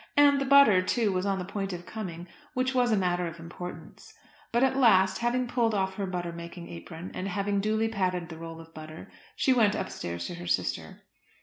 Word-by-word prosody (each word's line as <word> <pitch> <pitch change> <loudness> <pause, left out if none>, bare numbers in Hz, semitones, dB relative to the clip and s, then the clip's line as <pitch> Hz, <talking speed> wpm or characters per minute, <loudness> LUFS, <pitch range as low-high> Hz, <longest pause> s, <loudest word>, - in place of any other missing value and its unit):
And 285 -1 +6
the - - 0
butter, 275 -9 +7
too, 215 +3 +1
was 185 +1 -1
on 195 -1 +1
the 180 - -4
point 195 0 -3
of 175 0 -7
coming, 180 -4 -6 0.3
which 255 +1 +1
was 245 -2 +3
a 215 - +3
matter 180 -2 +1
of 165 0 -8
importance. 175 +2 -9 0.4
But 235 +2 +2
at 265 0 +3
last, 195 -8 +5
having 245 +1 0
pulled 235 -3 +1
off 190 -1 0
her 195 0 -3
butter 175 -2 -3
making 170 +1 -8
apron 160 - -8
and 185 - -4
having 200 +1 0
duly 220 +2 +1
patted 185 -5 -1
the 160 - -8
roll 165 0 -8
of 165 0 -13
butter, 155 0 -10 0.2
she 265 - +3
went 220 -5 +3
upstairs 85 0 -4
to - - -5
her 85 +1 -8
sister. 90 - -2
190 Hz, 210 wpm, -28 LUFS, 170-225 Hz, 0.4 s, butter